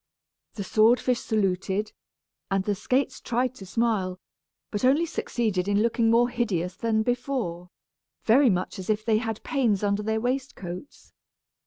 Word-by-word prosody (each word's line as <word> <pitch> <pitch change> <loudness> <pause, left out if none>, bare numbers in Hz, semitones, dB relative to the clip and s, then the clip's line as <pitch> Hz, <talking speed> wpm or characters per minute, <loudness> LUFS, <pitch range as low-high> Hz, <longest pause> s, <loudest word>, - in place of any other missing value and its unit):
The 200 - -4
sword 220 +5 +4
fish 250 -2 0
saluted, 195 -1 -1 0.6
and 195 -1 +1
the 205 - 0
skates 255 +7 -1
tried 250 +2 0
to 195 -7 -11
smile, 200 -4 0 0.5
but 205 - -3
only 280 +6 +4
succeeded 215 - -1
in 205 +1 +2
looking 230 0 +2
more 235 +1 +4
hideous 195 -8 -1
than 220 +1 0
before, 240 -8 -2 0.5
very 255 +4 +5
much 185 -1 -1
as 185 - -7
if 215 0 0
they 220 -2 +3
had 225 -2 -4
pains 230 -9 +1
under 200 0 +1
their 220 +1 -1
waistcoats. 245 -4 -5
220 Hz, 150 wpm, -26 LUFS, 195-245 Hz, 0.6 s, very